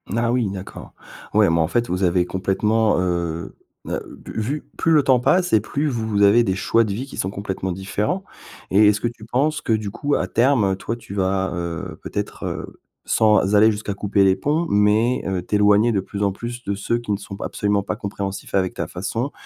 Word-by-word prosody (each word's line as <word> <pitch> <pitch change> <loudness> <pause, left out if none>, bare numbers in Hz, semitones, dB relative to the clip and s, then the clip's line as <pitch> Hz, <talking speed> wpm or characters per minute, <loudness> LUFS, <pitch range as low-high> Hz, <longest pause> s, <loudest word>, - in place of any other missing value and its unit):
Ah, 115 0 +1
oui, 120 -4 +1
d'accord. 95 0 -9 0.4
Ouais, - - +5
mais, 85 0 +2
en 80 - +2
fait, 120 0 0
vous 90 +2 -1
avez 90 0 +2
complètement, 105 +4 +1
heu 85 -2 -2 0.3
heu, - - -2 0.2
bu - - -7
vu 140 +8 -2
plus 165 - +1
le 150 -3 +5
temps 130 -2 +4
passe 180 +6 +2
et 110 - +6
plus 145 +8 -2
vous 110 -5 -1
avez 110 +4 +6
des 95 -2 0
choix 115 +4 +2
de 105 - -3
vie 125 +6 -4
qui 140 - -11
sont 95 - -1
complètement 95 -2 -4
différents 105 - -2 0.5
et 105 +2 +6
est-ce 105 0 +3
que 120 - -1
tu 115 -2 -9
penses 145 +6 0
que, 115 - 0
du 110 -2 -1
coup, 145 +5 -2
à - - -1
terme, 115 -6 +2
toi, 115 +4 -4
tu 115 - -11
vas, 95 0 0
heu, 85 -1 -5
peut-être, - - -4
heu, - - -6 0.3
sans 105 -2 +3
aller 110 +2 +6
jusqu'à 105 -1 -4
couper 100 -1 +1
les 95 -1 +4
ponts, 160 +4 0
mais, 105 +5 +2
heu, 95 -2 -1
t'éloigner 105 +4 +3
de 100 - +1
plus 100 +2 -6
en 100 - +2
plus 120 +5 -7
de 100 - -2
ceux 110 +4 -1
qui 120 -3 -5
ne 100 - +1
sont 100 -1 -9
p - - -7
absolument 100 -1 0
pas - - -3
compréhensifs 100 -3 -5
avec 95 -1 +1
ta - - -2
façon 115 +9 -3
105 Hz, 220 wpm, -21 LUFS, 95-120 Hz, 0.5 s, et